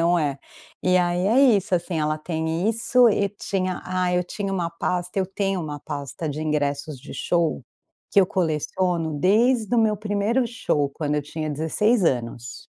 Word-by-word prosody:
Não 170 +1 +3
é. 145 -4 -1 0.4
E 185 0 +3
aí 180 +1 +1
é 240 +6 +4 0.2
isso, 190 -1 -1
assim, 175 -1 -1
ela 155 0 0
tem 160 +3 -2
isso 240 +2 +4
e 200 -2 +1
tinha, 185 -2 -3
ah, 180 -1 0
eu 180 - +2
tinha 195 +2 -4
uma 175 -3 -1
pasta 180 +2 -2
eu 190 - +1
tenho 195 -1 -1
uma 150 -3 -5
pasta 145 +1 -5
de 150 +2 -4
ingressos 145 -2 -2
de 140 - -10
show, 170 -6 0 0.5
que 200 - +5
eu 185 - +3
coleciono 165 -2 -1
desde 220 - +3
o 235 - +4
meu 215 -1 +3
1º 210 +4 0
show 150 - 0
quando 150 0 -2
eu 150 - 0
tinha 155 +1 -4
16 180 - +1
anos. 120 -4 -2
175 Hz, 180 wpm, -23 LUFS, 155-200 Hz, 0.5 s, que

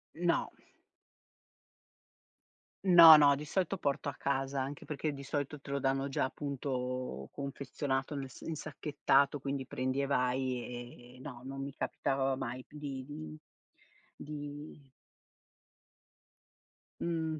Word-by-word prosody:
No. 170 0 +1 2.4
No, 170 -3 +11
no, 145 -2 +7
di 150 +2 -6
solito 190 +3 0
porto 140 -3 -1
a 140 - -7
casa, 135 0 -1
anche 135 +1 -4
perché 150 0 -2
di 140 - -8
solito 145 +1 -3
te - - -12
lo 140 0 0
danno 135 0 +1
già 135 - 0
appunto 130 - -3
confezionato 140 0 -3
nel 135 -1 -4
s 130 - -14
insacchettato, 145 -2 +1
quindi 135 -1 -3
prendi 130 +2 -1
e 140 - 0
vai, 125 -2 -2
e - - -15
no, 130 -3 -9
non 135 +1 -5
mi 140 0 -6
capitava 135 -1 0
mai 130 -1 -4
p - - -26
di 135 -3 -5
di 155 +2 -8 0.8
di 145 -1 -8 2.1
Mhmm, 160 -2 -1
140 Hz, 125 wpm, -33 LUFS, 130-145 Hz, 2.4 s, No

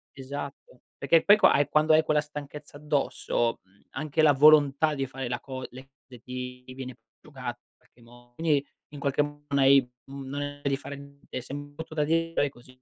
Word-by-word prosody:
Esatto. 140 -1 -8 0.2
Perché 160 +4 +3
poi 205 +1 +7
qua - - +6
hai 145 0 +3
quando 155 +1 +4
hai 155 0 +5
quella 150 -1 +2
stanchezza 150 0 -9
addosso, 145 -5 -1
mhmm, 95 +2 -29
anche 155 +2 -1
la 150 -2 +6
volontà 150 +1 +5
di 135 - -1
fare 135 0 -6
la 120 0 -3
co 130 -2 -7
le 130 +2 -12 0.2
le 125 - -12
ti 125 0 -7
ti 130 0 -11
viene 130 -1 -7 0.2
prosciugata 130 -5 -7
i 120 0 -11
qualche 120 - -28
mo 120 +1 -18
quindi 150 -4 +1 0.3
in 145 - -8
qualche 140 +1 +1
m 145 0 -8
non 140 0 +1
hai, 135 -1 +6 0.2
mhmm 135 0 -8
non 145 - -4
hai 145 0 -6
di 140 -1 +1
fare 140 0 -8
niente, 140 -2 -9
sem 145 +3 -8
brutto 160 +1 -8
da 150 - +1
di 165 +2 +1
però 145 - +2
e - - -2
così. 130 0 -18
140 Hz, 215 wpm, -27 LUFS, 130-150 Hz, 0.3 s, poi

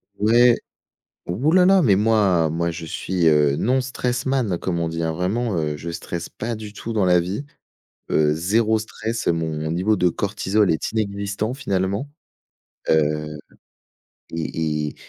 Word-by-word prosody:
Ouais. 120 +4 +5 0.7
Ouh 125 - 0
là 180 +1 +5
là, 190 -1 +5
mais 105 -10 +4
moi 100 -7 +3
moi 85 +1 -1
je 80 0 -7
suis, 85 +1 -1
heu, 75 -2 +4
non 130 +3 +2
stress 125 -1 -2
man 130 -9 0
comme 85 0 -2
on 85 - 0
dit 80 0 -3
hein, 80 - 0
vraiment, 95 +5 -1
heu, 75 -2 -1
je 85 +3 -6
stresse 85 0 -5
pas 115 +1 -4
du 105 -1 -8
tout 115 +2 -6
dans 105 -3 +1
la 90 -1 +4
vie. 95 +10 -3 0.7
Heu, 75 -1 +3
0 110 +7 +2
stress, 110 +1 -4
mon 80 -2 -1
niveau 95 +5 +1
de 90 -1 +3
cortisol 100 +2 0
est 80 - -1
inexistant 100 +1 -2
finalement. 100 -1 -2 0.8
Heu, 75 -1 +1 1.0
et 80 -2 -2
et - - -9
95 Hz, 160 wpm, -22 LUFS, 80-110 Hz, 1.0 s, Ouais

